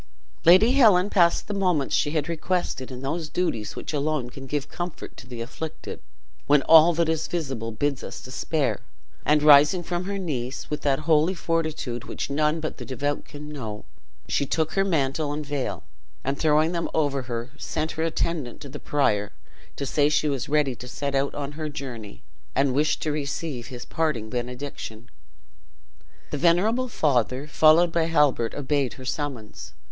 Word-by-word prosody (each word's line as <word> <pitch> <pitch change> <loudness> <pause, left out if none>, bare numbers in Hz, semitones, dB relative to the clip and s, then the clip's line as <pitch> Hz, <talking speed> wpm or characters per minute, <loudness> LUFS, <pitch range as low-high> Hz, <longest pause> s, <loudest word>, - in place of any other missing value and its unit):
Lady 185 +8 +7
Helen 210 -8 +5
passed 170 -4 +3
the 210 - -3
moments 180 -8 +1
she 145 - +2
had 150 -1 -1
requested 170 -5 -2
in 130 0 -8
those 155 +3 -3
duties 115 -13 -2
which - - -6
alone 145 -4 -1
can 135 +1 -9
give 145 0 -2
comfort 175 +2 -6
to 125 - -12
the 120 -2 -7
afflicted, 155 +6 -6 0.5
when 145 -1 +5
all 160 +3 +8
that 165 0 +1
is 160 0 0
visible 135 -9 -3
bids 140 +5 -1
us - - -7
despair; 135 +2 -1 0.5
and 150 0 +4
rising 150 +4 +7
from 175 +1 -3
her 200 +1 -3
knees, 135 -9 -3
with 150 0 -2
that 140 0 +1
holy 160 +3 +3
fortitude 155 -8 -2
which - - -5
none 150 +2 +1
but 155 -1 -4
the - - -7
devout 145 +3 -2
can 150 +1 -9
know, 110 -8 -6 0.4
she - - +1
took 160 +3 0
her 195 - +2
mantle 150 -4 0
and 150 +1 -4
veil, 140 -2 -3 0.4
and 135 +1 -2
throwing 155 +1 +3
them 170 -1 -2
over 145 -3 +1
her, 120 +1 -4
sent 155 +1 -2
her 160 - -4
attendant 165 -5 -2
to 140 - -9
the - - -8
prior, 105 -8 +1 0.4
to 140 - -4
say 145 +2 +2
she 150 0 +2
was 135 -3 -2
ready 150 -3 +2
to 125 - -10
set 140 +2 -3
out 140 0 0
on 145 -1 -4
her 155 +1 -5
journey, 120 - -7 0.3
and 135 -1 +2
wished 150 +3 +1
to 155 - 0
receive 145 -3 -3
his 125 -2 -8
parting 140 -10 -1
benediction. 125 -2 -5 1.2
The 145 - -2
venerable 205 - +3
father, 135 - +1
followed 160 +3 +5
by 165 -1 +1
Halbert, 150 -8 +2
obeyed 140 -2 0
her 130 - -11
summons. 130 -6 -5
145 Hz, 175 wpm, -25 LUFS, 135-160 Hz, 1.2 s, all